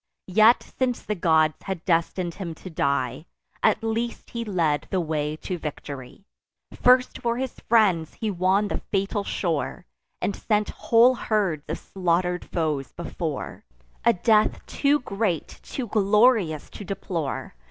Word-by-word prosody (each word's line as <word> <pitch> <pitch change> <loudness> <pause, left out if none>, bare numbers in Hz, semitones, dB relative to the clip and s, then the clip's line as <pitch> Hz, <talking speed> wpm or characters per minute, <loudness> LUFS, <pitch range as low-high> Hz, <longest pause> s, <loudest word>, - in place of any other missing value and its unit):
Yet, 220 +4 +6 0.2
since 255 -2 0
the 210 - -2
gods 160 -5 +2
had 190 -3 -5
destin'd 170 0 0
him 170 -4 -6
to 185 - -10
die, 140 0 -1 0.3
At 220 0 +3
least 230 +1 -3
he 235 -1 -3
led 170 -8 0
the 190 - 0
way 155 -2 -1
to 175 +3 -5
victory: 145 +2 -7 0.5
First 250 0 +4
for 235 0 0
his 260 -1 -4
friends 190 -9 +3
he 220 -2 -2
won 190 +3 +2
the - - -2
fatal 195 0 -1
shore, 160 -5 -2 0.3
And 200 - -1
sent 210 -1 0
whole 235 +2 +4
herds 200 - -1
of - - -2
slaughter'd 180 -1 -1
foes 150 -6 -2
before; - - -5 0.4
A 235 - +5
death 215 +2 +2
too 290 +1 +1
great, 195 -7 -2
too 260 - -5
glorious 210 - +3
to - - -8
deplore. 175 - -4
190 Hz, 140 wpm, -25 LUFS, 160-220 Hz, 0.5 s, Yet